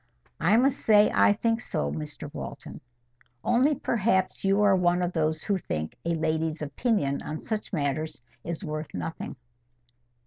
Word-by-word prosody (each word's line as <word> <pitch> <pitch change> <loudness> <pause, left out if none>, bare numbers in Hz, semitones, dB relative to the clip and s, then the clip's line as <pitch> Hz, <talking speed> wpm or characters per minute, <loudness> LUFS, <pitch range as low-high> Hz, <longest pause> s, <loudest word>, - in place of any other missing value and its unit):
I 195 +7 +4
must 265 +3 +3
say 210 -1 +5
I - - +5
think 225 +2 0
so, 70 - -2
Mr 75 0 -6
Walton. - - -7 0.6
Only 255 +5 +3
perhaps 210 -7 0
you 195 +1 +3
are 200 -2 +5
one 180 -1 +2
of 175 0 -1
those 155 -1 0
who 200 -3 0
think 80 - -4
a 170 0 0
lady's 160 0 -1
opinion 145 - 0
on 155 +1 -5
such 215 -2 -4
matters 155 - -2 0.2
is 170 -1 -5
worth 155 0 -5
nothing." 165 - -5
175 Hz, 150 wpm, -27 LUFS, 155-210 Hz, 0.6 s, say